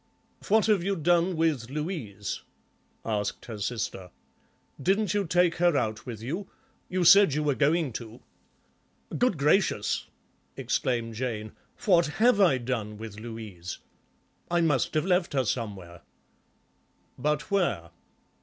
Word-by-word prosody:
"What 220 Hz, +1 st, +4 dB
have 210 Hz, -5 st, +3 dB
you 195 Hz, +1 st, 0 dB
done 175 Hz, +2 st, +2 dB
with 150 Hz, -8 st, 0 dB
Louise?" 140 Hz, -, -4 dB, 0.6 s
asked 105 Hz, -2 st, -2 dB
her 110 Hz, -3 st, -7 dB
sister. 100 Hz, -4 st, -3 dB, 0.7 s
"Didn't 195 Hz, +4 st, +1 dB
you 205 Hz, -3 st, 0 dB
take 175 Hz, 0 st, +3 dB
her 175 Hz, -3 st, +3 dB
out 110 Hz, +1 st, -2 dB
with 115 Hz, -3 st, -6 dB
you? 170 Hz, -, -4 dB, 0.4 s
You 185 Hz, 0 st, 0 dB
said 195 Hz, -3 st, +7 dB
you 150 Hz, -, 0 dB
were 145 Hz, -1 st, +2 dB
going 150 Hz, 0 st, +1 dB
to." 115 Hz, +1 st, -11 dB, 1.0 s
"Good 245 Hz, -8 st, +2 dB
gracious," 150 Hz, -, +1 dB, 0.5 s
exclaimed 115 Hz, -2 st, -1 dB
Jane, 110 Hz, -2 st, -4 dB, 0.3 s
"what 175 Hz, -5 st, +5 dB
have 225 Hz, -2 st, +4 dB
I 170 Hz, -9 st, +5 dB
done 115 Hz, -4 st, -3 dB
with 110 Hz, -1 st, -8 dB
Louise? 110 Hz, -6 st, -7 dB, 0.7 s
I 175 Hz, 0 st, +2 dB
must 150 Hz, -6 st, +1 dB
have 155 Hz, +1 st, +2 dB
left 180 Hz, -3 st, +1 dB
her 135 Hz, -2 st, +1 dB
somewhere." 100 Hz, -7 st, -4 dB, 1.2 s
"But 150 Hz, +4 st, -1 dB
where?" 170 Hz, -, 0 dB
145 Hz, 130 wpm, -27 LUFS, 110-175 Hz, 1.2 s, said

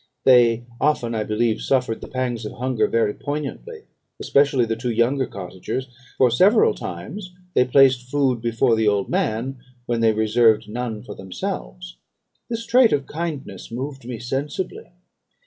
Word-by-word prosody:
They 120 Hz, -2 st, +5 dB
often, 130 Hz, -6 st, +1 dB
I 110 Hz, -1 st, -1 dB
believe, 110 Hz, +1 st, 0 dB
suffered 125 Hz, -4 st, 0 dB
the -, -, -7 dB
pangs 125 Hz, -3 st, -3 dB
of 105 Hz, -, -6 dB
hunger 125 Hz, -1 st, 0 dB
very 115 Hz, -3 st, +1 dB
poignantly, 150 Hz, -, -5 dB, 0.4 s
especially 140 Hz, -3 st, +3 dB
the 115 Hz, 0 st, -2 dB
two 120 Hz, +2 st, -3 dB
younger 120 Hz, +3 st, +1 dB
cottagers; 100 Hz, +7 st, -6 dB, 0.3 s
for 125 Hz, -2 st, +4 dB
several 190 Hz, -, +5 dB
times 180 Hz, -, -7 dB, 0.2 s
they 125 Hz, -, +4 dB
placed 130 Hz, -1 st, +4 dB
food 130 Hz, -4 st, +1 dB
before 115 Hz, +1 st, +2 dB
the 110 Hz, -1 st, +1 dB
old 100 Hz, -1 st, +1 dB
man, 125 Hz, +5 st, -1 dB, 0.3 s
when 120 Hz, -1 st, -1 dB
they 115 Hz, -1 st, +5 dB
reserved 110 Hz, 0 st, +3 dB
none 110 Hz, -1 st, -4 dB
for -, -, -8 dB
themselves. -, -, -6 dB, 0.5 s
"This 230 Hz, -1 st, -4 dB
trait 245 Hz, -1 st, +5 dB
of 140 Hz, -2 st, 0 dB
kindness 155 Hz, -3 st, -5 dB
moved 135 Hz, +3 st, -5 dB
me 120 Hz, 0 st, -6 dB
sensibly. 145 Hz, -, -4 dB
120 Hz, 150 wpm, -22 LUFS, 110-140 Hz, 0.5 s, They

